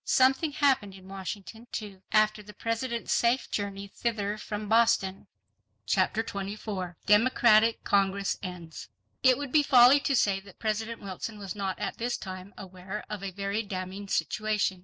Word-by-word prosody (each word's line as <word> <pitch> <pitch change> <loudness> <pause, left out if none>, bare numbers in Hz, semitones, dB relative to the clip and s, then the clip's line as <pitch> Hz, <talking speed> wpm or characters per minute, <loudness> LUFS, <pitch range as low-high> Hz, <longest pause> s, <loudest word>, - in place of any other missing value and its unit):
Something 270 +4 +3
happened 265 -10 +2
in 190 -1 -14
Washington, 195 +3 -7
too, 200 -3 -6
after 215 0 +3
the 210 0 -13
President's 230 +1 -2
safe 240 +3 +1
journey 200 -1 -3
thither 210 -1 -2
from 210 0 -5
Boston. 220 -4 +2 0.6
Chapter 225 - +1
24 200 -3 -5
Democratic 225 +1 +4
Congress 195 0 +1
Ends 175 -4 -8 0.3
It 255 -2 +5
would 285 -2 -5
be 305 - +5
folly 265 -1 +7
to 275 0 0
say 200 -5 +2
that 195 -1 -16
President 220 +1 -2
Wilson 200 +3 -6
was 195 -3 -6
not 195 -2 -3
at - - -4
this 240 +1 -1
time 185 0 -8
aware 190 +2 -7
of 210 -2 -4
a 195 - -3
very 200 +3 -2
damning 195 -1 -6
situation. 210 -2 0
210 Hz, 155 wpm, -28 LUFS, 195-230 Hz, 0.6 s, folly